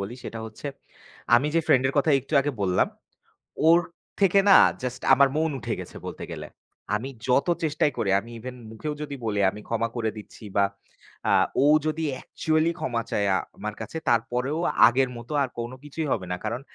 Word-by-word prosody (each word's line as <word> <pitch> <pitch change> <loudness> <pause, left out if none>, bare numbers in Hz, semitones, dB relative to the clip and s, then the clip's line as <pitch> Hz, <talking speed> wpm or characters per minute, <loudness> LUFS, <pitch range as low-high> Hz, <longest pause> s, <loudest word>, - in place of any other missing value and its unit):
বলি 100 +5 -5
সেটা 115 - -6
হচ্ছে, 110 +6 -9 0.7
আমি 130 +5 +4
যে 165 - +4
ফ্রেন্ডের 130 +1 +3
কথা 150 +3 +3
একটু 140 +4 -6
আগে 145 +2 -1
বললাম, 90 -1 +2 0.8
ওর 170 +1 +7 0.4
থেকে 195 0 +5
না 195 - +10 0.3
জাস্ট 125 0 -4
আমার 140 0 +6
মন 160 +1 +1
উঠে - - -3
গেছে - - -9
বলতে - - -6
গেলে। - - -6 0.5
আমি 125 +6 -3 0.2
যত 130 +5 +3 0.2
চেষ্টাই 150 -1 +1
করি। 100 - 0
আমি 110 +4 -12
ইভেন 125 +2 -7 0.2
মুখেও 150 +7 -4
যদি 145 -1 -5
বলি 105 -2 -1
আমি 105 - -10
ক্ষমা 115 0 0
করে 110 -2 0
দিচ্ছি। 105 - -12
বা 100 - +5 0.7
আ - - +5 0.3
ও - - +4 0.2
যদি 155 +1 -1
অ্যাকচুয়ালি 155 +4 0
ক্ষমা 115 -2 -1
চায় 100 - +1
আ - - +3 0.2
আমার 105 +1 -5
কাছে, - - -6
তারপরেও 125 +6 0 0.3
আগের 130 +1 +2
মত 120 +1 -11
আর 130 - -3
কোন 120 +1 -4
কিছুই 150 +2 -4
হবে 95 - -1
না। 90 - -1
কারণ 120 +2 -2
125 Hz, 185 wpm, -25 LUFS, 110-150 Hz, 0.8 s, না